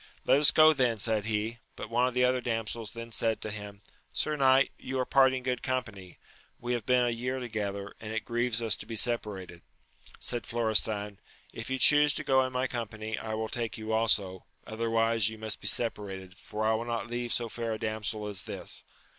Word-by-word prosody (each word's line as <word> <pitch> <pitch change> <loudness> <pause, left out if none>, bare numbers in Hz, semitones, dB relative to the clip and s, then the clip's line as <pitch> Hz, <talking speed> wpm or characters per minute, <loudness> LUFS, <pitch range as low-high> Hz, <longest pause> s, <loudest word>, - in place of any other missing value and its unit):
Let 140 - +5
us 150 - +7
go 155 0 +7
then! 125 -5 +1
said 110 -1 +1
he; 110 +1 -2 0.2
but 110 - -8
one 120 +2 +3
of 125 - -4
the 125 0 +4
other 125 0 +1
damsels 115 -2 -3
then 115 +1 -9
said 115 0 0
to 110 - -4
him. 105 -1 -8 0.3
Sir 155 - -1
knight, 135 -1 +4
you 135 0 -4
are 130 - 0
parting 130 -1 +3
good 125 -2 -1
company; 110 -8 -4 0.4
we 120 +1 -2
have 120 -3 -3
been 125 -1 +4
a 120 - +1
year 125 +3 -2
together, 100 -4 -4
and 110 -1 -7
it 110 0 -3
grieves 120 -1 0
us 115 - +2
to - - -10
be 115 - -5
separated. 105 -7 -1 0.6
Said 120 -4 -3
Florestan, 110 -3 +2 0.3
If 115 - -6
you 130 - -1
chuse 150 +1 +6
to - - -2
go 130 0 +3
in 130 - -3
my 125 +1 0
company 110 -3 -4
I 110 -1 -5
wiU 110 0 -3
take 115 -2 -3
you 110 0 -5
also, 105 -5 +2 0.2
otherwise 115 -1 +1
you 110 - -9
must 110 -1 -4
be - - -4
separated, 95 -5 -1
for 105 +2 -5
I 110 - +3
will 115 +1 -2
not 120 -1 -2
leave 120 0 -4
so 120 - +1
fair 115 0 -3
a - - -3
damsel 110 -1 -3
as 105 -2 -3
this. - - -4
115 Hz, 210 wpm, -29 LUFS, 110-125 Hz, 0.6 s, us